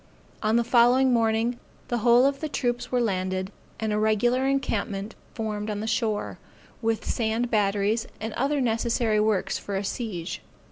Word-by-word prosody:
On 215 +1 +2
the 235 - +4
following 245 +2 +4
morning, 230 +1 +1 0.3
the 240 - 0
whole 240 +3 +5
of 275 0 +1
the 310 - -3
troops 245 -3 -2
were 250 - +2
landed, 185 -3 -1 0.3
and 220 -1 -1
a 210 - +1
regular 240 +5 +2
encampment 220 -6 -1 0.2
formed 215 -2 -3
on 210 -1 -2
the 215 - -3
shore, 220 -2 -1 0.4
with 225 -1 -1
sand 230 +1 -1
batteries, 210 +1 +1
and 220 0 -4
other 280 +3 0
necessary 230 -2 +1
works 210 -3 +1
for 200 - -5
a 195 - -1
siege. 195 -5 -4
225 Hz, 160 wpm, -26 LUFS, 210-240 Hz, 0.4 s, whole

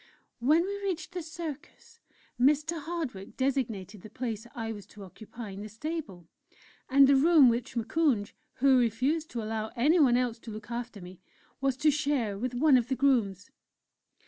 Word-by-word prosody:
When 300 +8 +4
we 405 +1 -4
reached 380 -3 -3
the 360 -1 -4
Circus, 330 - -9 0.4
Mr. 300 +5 +2
Hardwick 285 - -5
designated 225 -8 -2
the 215 - -11
place 225 -1 -5
I 225 -2 -4
was 205 -2 -11
to 205 -1 -12
occupy 215 +3 -10
in 195 +1 -8
the 215 - -7
Stable, 220 - -6 0.6
and 275 +1 +7
the 275 +1 +5
room 295 -1 +6
which 240 +2 -2
Moukounj 235 -3 0 0.2
(who 265 0 +4
refused 255 +8 0
to 230 -2 -4
allow 220 0 -3
anyone 275 -1 +4
else 245 -2 -1
to 225 - -9
look 215 +2 -9
after 235 -3 -5
me) 180 0 -11 0.4
was 270 -2 0
to 300 +2 +4
share 275 -8 0
with 245 +4 -4
one 275 +1 +5
of 240 -1 0
the 265 - -1
grooms. 230 -8 +1
250 Hz, 170 wpm, -29 LUFS, 220-300 Hz, 0.6 s, and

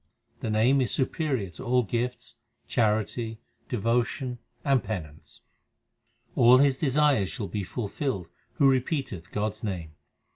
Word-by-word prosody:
The - - -3
Name 120 +6 +4
is 125 - +1
superior 130 - -1
to 90 - -9
all 125 0 +3
gifts, 120 +3 -3 0.3
charity, 110 +1 0 0.3
devotion, 120 +2 0 0.3
and 135 -4 +3
penance. 80 -8 -7 0.9
All 120 +2 +7
his 135 -1 +3
desires 140 - +3
shall 105 -6 -4
be 105 - -3
fulfilled 100 - -3 0.3
who 140 - +4
repeateth 130 - 0
God 105 +1 0
s - - -16
name. 90 -7 -4
120 Hz, 125 wpm, -27 LUFS, 105-130 Hz, 0.9 s, All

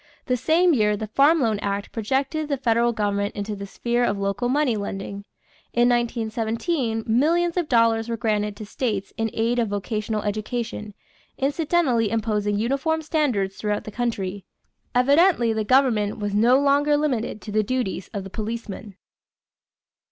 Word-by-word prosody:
The 250 - +1
same 335 +7 +3
year 210 -5 +2
the 215 - -4
Farm 280 +9 +4
Loan 220 -4 +1
Act 200 0 -3
projected 270 +7 -1
the 280 - 0
federal 235 -1 +2
government 205 -2 -1
into 205 +1 -4
the 200 0 -7
sphere 240 +4 -1
of 205 -4 +1
local 200 +5 -1
money 275 -3 +2
lending. 200 0 -5 0.5
In 240 0 +4
1917 230 +2 -1
millions 330 +9 +2
of 350 -4 -1
dollars 230 -1 +3
were 230 - -2
granted 210 -2 -1
to 215 - -8
states 205 -3 -3
in 225 0 -1
aid 230 +2 0
of 230 - +1
vocational 210 +1 -2
education, 215 0 -4 0.4
incidentally 280 -5 +1
imposing 210 -2 0
uniform 275 +8 0
standards 255 - 0
throughout 210 -1 -2
the 215 - -8
country. 205 -5 -3 0.5
Evidently 280 -1 +4
the 220 0 -1
government 225 -4 +2
was 205 -1 -3
no 235 +5 +5
longer 285 +1 +3
limited 255 -8 -1
to 215 - -8
the 215 +1 +2
duties 215 -4 -2
of 200 -2 -4
the 195 - -9
policeman. 215 -2 -6
225 Hz, 155 wpm, -23 LUFS, 210-265 Hz, 0.5 s, no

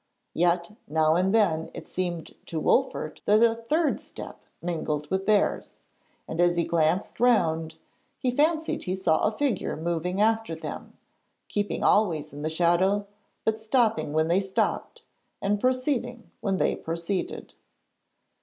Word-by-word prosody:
Yet, 170 +2 +1 0.2
now 155 +1 +3
and 185 +3 +2
then 175 -8 +2
it - - -8
seemed 175 -3 -3
to 160 - -3
Wolfert 155 - 0
that 215 +2 +5
a 230 -1 +5
third 295 +8 0
step - - -10
mingled 155 -3 -2
with 190 0 -1
theirs, 210 -2 +1 0.5
and 165 +2 -1
as 175 0 +3
he 170 - +3
glanced 165 +3 0
round 165 -10 +2 0.4
he 255 - 0
fancied 315 +4 +1
he 185 - -1
saw 175 -4 +2
a 215 - +2
figure 230 - -1
moving 170 +3 -2
after 220 -4 +2
them, 160 - -8 0.5
keeping 205 0 -2
always 160 -8 +2
in 145 - -7
the 155 - -1
shadow 180 +5 +2 0.4
but 220 0 +1
stopping 220 - +1
when 155 +1 +2
they 175 +3 +3
stopped, 190 -1 -2 0.4
and 205 +1 0
proceeding 255 -2 -1
when 200 -5 0
they - - +1
proceeded. 170 +3 -4
185 Hz, 145 wpm, -26 LUFS, 165-220 Hz, 0.5 s, that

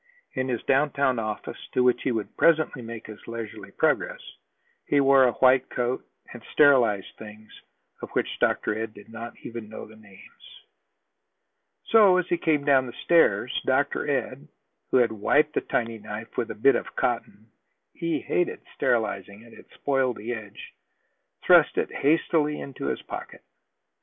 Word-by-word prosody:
In 130 0 -2
his 125 -3 -3
downtown 135 -2 +1
office, 110 -1 -5
to 125 - +2
which 125 -1 +3
he 130 - -1
would 110 -3 -4
presently 155 -5 +2
make 115 -1 -8
his 110 -1 -10
leisurely 115 -2 -7
progress, - - 0 0.7
he 145 - +3
wore 135 -1 +5
a 125 - +2
white 130 0 +3
coat, 125 +1 -2 0.3
and 120 - -10
sterilized 125 -10 +3
things 110 0 -12 0.5
of - - -7
which - - -2
Dr. - - +1
Ed 110 0 -5
did 105 - -14
not 115 +1 -8
even 115 -2 -8
know 110 - -8
the 110 - -16
names. 100 -3 -17 1.2
So, 205 -5 +6
as 180 - +1
he 175 - 0
came 150 -4 +1
down 135 -3 +4
the 120 - -8
stairs, 170 -1 +3
Dr. - - 0
Ed, - - -3 0.4
who - - +3
had 120 -3 +3
wiped 145 +8 +2
his - - -2
tiny 115 -1 -2
knife 105 +2 -8
with 115 - -2
a - - -5
bit 135 +6 +4
of - - -4
cotton, 110 -2 -3 0.4
he 170 -2 -2
hated 175 - -1
sterilizing 105 -2 -1
it; 115 - -17
it - - -16
spoiled 135 -3 0
the 115 +4 -4
edge, 105 -3 -10 0.7
thrust - - +5
it - - -1
hastily 150 0 +1
into 135 - -6
his - - -3
pocket. - - -8
120 Hz, 160 wpm, -25 LUFS, 110-140 Hz, 1.2 s, So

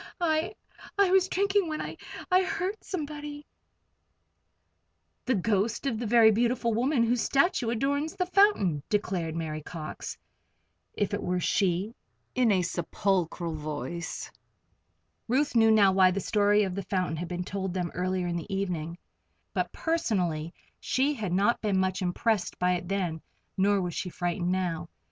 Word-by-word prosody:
"I 320 -1 0 0.4
I 400 -2 +4
was 380 -1 +5
drinking 400 +1 +2
it - - -6
when 310 -1 -3
I - - -5 0.4
I 365 +1 +6
heard 380 +1 -2
somebody 295 -3 -5 0.9
" - - -48
"The 255 - +3
ghost 210 +4 0
of 235 -5 -1
the 235 - -2
very 225 0 +6
beautiful 235 +1 +1
woman 245 +2 +2
whose 235 0 +1
statue 275 -5 +2
adorns 285 +6 -1
the 365 - 0
fountain," 355 - +3
declared 185 -6 -1
Mary 155 -2 -3
Cox, 155 0 -7 0.8
if 205 0 -1
it 205 - -1
were 180 0 -1
she, 190 +3 +1 0.4
in 250 -3 +3
a 185 -2 +3
sepulchral 175 -1 -1
voice. 155 +1 -5 1.0
Ruth 265 +3 +1
knew 225 -1 +6
now 210 -3 +6
why 190 -1 +5
the 185 +2 -1
story 205 +1 +3
of 190 -2 -2
the 200 - -3
fountain 185 -3 -1
had 175 +2 -4
been 180 +1 -3
told 190 0 -4
them 175 -2 -2
earlier 185 0 -1
in 175 -1 -1
the 170 +4 -7
evening, 175 -4 -2 0.6
but - - -1
personally 180 - -1 0.3
she 275 +3 +1
had 215 -9 -4
not 200 +6 +2
been 205 -3 +1
much 185 0 0
impressed 185 +2 0
by 180 0 +2
it 180 0 -3
then, 180 -5 -2 0.3
nor 200 +1 +3
was 180 -2 -2
she 180 - -3
frightened 175 0 -1
now. 180 -3 -2
200 Hz, 160 wpm, -28 LUFS, 180-250 Hz, 1.0 s, I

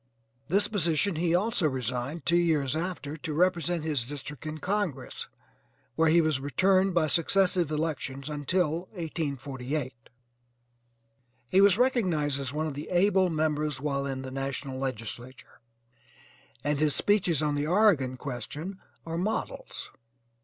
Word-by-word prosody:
This 200 +5 +3
position 175 -1 +1
he 170 +1 +1
also 195 -3 +1
resigned 130 +4 -3
two 170 - +3
years 155 -5 +2
after 160 -3 -3
to 155 0 -5
represent 175 -1 +1
his 150 -6 +1
district 145 +3 -7
in 155 0 -4
congress 180 -7 -3 0.7
where 160 0 +4
he 170 +2 +6
was 155 -4 +1
returned 185 +7 +2
by 170 -2 +4
successive 175 +2 +2
elections 150 -3 -3
until 160 +3 -1
1848. 140 - -3 1.6
He 190 - +5
was 200 -1 +6
recognized 180 - +1
as 135 -2 -3
one 155 +2 -2
of 155 - -3
the 145 +3 -7
able 185 +1 +3
members 155 -3 0
while 140 -1 -1
in 135 -1 -4
the 130 - -6
national 135 0 -4
legislature, 125 0 -6 1.0
and 145 -1 0
his 150 -2 +3
speeches 180 -7 +2
on 150 -1 +1
the 145 +1 -1
Oregon 165 -9 +3
question 150 +8 -6 0.3
are 165 0 -3
models. 210 +5 -4
155 Hz, 135 wpm, -28 LUFS, 140-180 Hz, 1.6 s, he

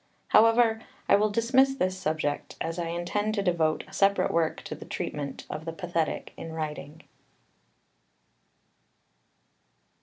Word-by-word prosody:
However, 225 0 +5 0.3
I - - +6
will 210 +1 +3
dismiss 260 +5 +3
this 185 -7 0
subject, 155 -5 -2
as 165 +1 -3
I 170 - -2
intend 180 +6 -1
to 200 - 0
devote 165 -4 +1
a - - -16
separate 200 0 +3
work 165 -1 0
to - - -6
the - - -9
treatment 140 -2 -5
of 155 - -5
the 165 0 -5
pathetic 170 -2 -2
in 165 - -7
writing. 155 -1 -6
175 Hz, 130 wpm, -28 LUFS, 160-215 Hz, 0.3 s, I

